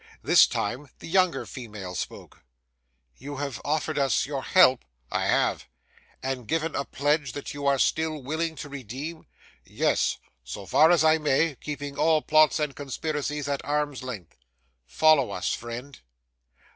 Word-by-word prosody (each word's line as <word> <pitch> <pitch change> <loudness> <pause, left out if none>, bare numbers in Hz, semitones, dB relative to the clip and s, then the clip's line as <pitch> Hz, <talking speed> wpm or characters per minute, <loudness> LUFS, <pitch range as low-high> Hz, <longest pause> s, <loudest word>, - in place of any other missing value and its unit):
This - - +7
time 125 +7 -3
the - - -12
younger 185 0 +2
female 105 -8 -8
spoke. 85 - -7 0.7
'You 145 +3 -7
have 140 -3 -4
offered 155 0 -1
us 135 -2 +2
your 140 -1 -4
help?' 130 -6 +5 0.3
'I - - 0
have.' - - +1 0.6
'And 130 -3 -3
given 165 +3 -1
a 140 - -2
pledge 145 -2 0
that 145 - -6
you 140 0 -3
are 140 -1 +4
still 155 +3 +1
willing 160 +4 -3
to 145 - -7
redeem?' 140 +5 -7 0.4
'Yes. - - 0 0.3
So - - -7
far 155 - +5
as 170 -3 +4
I 160 0 +5
may, 150 +1 +2
keeping 145 -1 -6
all 160 -1 +3
plots 155 -1 +4
and 150 -3 -2
conspiracies 145 +1 -3
at 140 -1 -2
arm's 145 -2 -1
length.' 120 -9 -8 0.5
'Follow 155 - +4
us, - - -2
friend. 120 +4 -7
145 Hz, 150 wpm, -26 LUFS, 130-155 Hz, 0.7 s, This